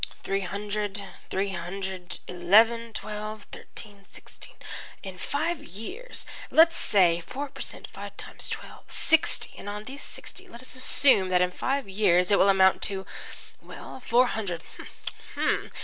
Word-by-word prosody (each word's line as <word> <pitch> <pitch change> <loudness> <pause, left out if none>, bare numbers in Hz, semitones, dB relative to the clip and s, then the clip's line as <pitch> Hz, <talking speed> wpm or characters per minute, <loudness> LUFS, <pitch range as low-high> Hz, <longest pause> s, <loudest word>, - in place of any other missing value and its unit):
"Three 195 - 0
hundred 205 +1 -3 0.3
three 195 +1 0
hundred 190 0 -5
eleven 225 +6 +4
twelve 215 0 -5
thirteen 205 -2 -10
sixteen - - -9 0.5
in 190 -2 -7
five 310 - -1
years! 370 - -6 0.2
Let's 330 +1 +7
say 175 -4 +4
four 275 +11 -5
per - - -10
cent - - -5
five - - -8
times - - -4
twelve - - -7
sixty, 320 0 +3
and 205 - -6
on 210 +1 -5
these 270 +5 -8
sixty. - - -3
Let 235 +2 -10
us - - -5
assume 255 -6 +4
that 180 0 +4
in 180 - 0
five 270 +5 -1
years 190 -2 +3
it 200 - +6
will 200 - +6
amount 190 -1 +5
to 190 -1 -4 0.6
well, - - -9
four 245 0 +4
hundred. 195 -8 -3
205 Hz, 145 wpm, -27 LUFS, 190-245 Hz, 0.6 s, Let's